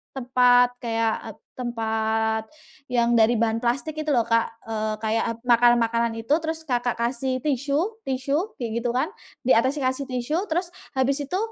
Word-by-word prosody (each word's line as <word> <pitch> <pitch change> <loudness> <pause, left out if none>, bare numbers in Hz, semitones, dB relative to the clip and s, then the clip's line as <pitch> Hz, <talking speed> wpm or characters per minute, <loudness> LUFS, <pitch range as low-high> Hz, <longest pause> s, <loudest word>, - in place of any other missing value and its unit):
tempat 250 -1 +4
kayak 225 -1 0 0.4
tempat, 220 -2 -1 0.4
yang 240 -2 +2
dari 225 +1 +5
bahan 225 0 +1
plastik 265 +6 -2
itu 310 - -3
loh 240 - +4
Kak, 230 0 +2 0.2
eee, 215 -1 -2
kayak 225 +1 -1
makanan-makanan 235 -1 +3
itu 225 +2 -8
terus 320 0 -3
Kakak, 245 -3 0
kasih 255 +2 -1
tisu 295 - -1
tisu 275 - -1
kayak 230 -2 -2
gitu 240 - -1
kan, 260 +8 0 0.3
di 250 -2 +4
atasnya 260 +2 +1
kasih 270 +2 -4
tisu 295 - -1
terus 350 +2 -1 0.2
habis 265 +1 +1
itu 325 +7 -2
245 Hz, 150 wpm, -24 LUFS, 230-275 Hz, 0.4 s, dari